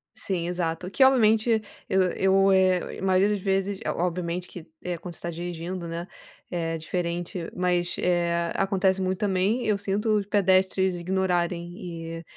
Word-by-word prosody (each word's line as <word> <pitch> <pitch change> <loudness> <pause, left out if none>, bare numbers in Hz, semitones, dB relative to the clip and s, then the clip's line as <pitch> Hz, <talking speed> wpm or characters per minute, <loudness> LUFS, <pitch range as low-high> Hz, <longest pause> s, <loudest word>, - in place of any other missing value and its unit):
Sim, 175 -3 -2
exato, 175 0 -2
que, 265 - +3
obviamente, 225 -3 +4 0.3
eu 190 - +3
eu 195 +1 +3
eh, 185 -2 +2
maioria 190 +1 +3
das 210 -1 0
vezes 195 0 0
eh, - - -2
obviamente, 175 0 -2
que, 170 -2 -10 0.2
eh, 175 -1 -3
quando 170 +1 -8
você - - -10
tá 170 - -3
dirigindo, 170 +1 -5
né, 170 +2 -5 0.4
é 165 -2 -2
diferente, 170 +1 -3
mas, 180 -1 0
eh, 170 -1 +1
acontece 190 -1 +1
muito 185 0 -1
também, 205 +4 +1
eu 210 -2 +2
sinto 210 +2 0
os 200 - -1
pedestres 190 -2 +2
ignorarem 175 -1 -1
e, 165 -3 -7
185 Hz, 155 wpm, -26 LUFS, 170-195 Hz, 0.4 s, obviamente